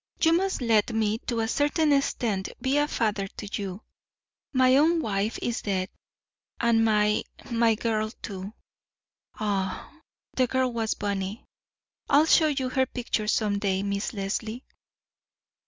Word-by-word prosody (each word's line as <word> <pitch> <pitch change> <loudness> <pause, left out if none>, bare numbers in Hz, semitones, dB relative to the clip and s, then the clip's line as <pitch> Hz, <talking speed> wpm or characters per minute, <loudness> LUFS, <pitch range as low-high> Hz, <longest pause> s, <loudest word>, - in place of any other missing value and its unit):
You 325 0 +4
must 375 -5 0
let 225 -1 +3
me, 220 0 +1
to 235 -2 0
a 225 - 0
certain 295 +4 +2
extent, 225 -8 0
be 265 +4 +1
a 295 - +2
father 210 -7 -1
to 205 - -6
you. 195 +1 -6 0.7
My 255 -1 +4
own 325 +4 +4
wife 210 -5 -1
is 240 -1 -1
dead, 190 -2 -1 0.7
and 230 -1 +3
my—my 220 +2 +1
girl, 215 -1 -1
too. 195 0 -6 0.8
Aye, 200 -4 -3 0.3
the 255 -1 +2
girl 260 0 0
was 225 -1 -1
bonny. 200 +1 -3 0.6
I'll 290 +2 +5
show 320 -1 +5
you 270 -4 -1
her 260 0 +1
picture 235 -4 -2
some 210 -2 +1
day, 195 -1 0
Miss 200 0 -2
Leslie." 215 +4 -4
225 Hz, 140 wpm, -26 LUFS, 205-260 Hz, 0.8 s, I'll